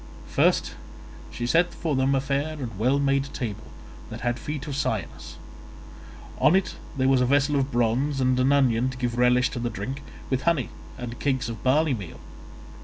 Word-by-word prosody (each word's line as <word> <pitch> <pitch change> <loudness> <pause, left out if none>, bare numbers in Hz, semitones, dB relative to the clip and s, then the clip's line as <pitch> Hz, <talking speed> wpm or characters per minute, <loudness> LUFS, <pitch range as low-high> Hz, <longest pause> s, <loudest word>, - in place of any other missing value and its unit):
First - - +2 0.6
she 120 - -4
set 170 +7 +2
for 160 -4 -1
them 135 +1 +2
a 135 - +1
fair 140 +3 -1
and 120 -9 -6
well 130 +5 +3
made 140 -1 +2
table 110 -6 -4 0.4
that - - -7
had 120 0 -1
feet 150 -1 -5
of 145 -3 -4
cyanus; 110 -9 -3 1.0
on 160 - +5
it 195 - +1 0.2
there 130 -1 +2
was 135 -1 +4
a - - +4
vessel 140 +2 +3
of 140 0 0
bronze 120 +4 +1
and 130 -1 +2
an 130 +2 +3
onion 130 -3 +3
to 130 - -7
give 120 -1 -2
relish 125 0 +4
to - - -4
the 120 0 -1
drink, 130 +5 -5 0.3
with 130 0 +1
honey 165 -6 +1 0.3
and 120 -1 -6
cakes 130 -4 0
of 115 -2 -6
barley 145 +3 +3
meal. 100 -9 -7
130 Hz, 185 wpm, -25 LUFS, 120-140 Hz, 1.0 s, on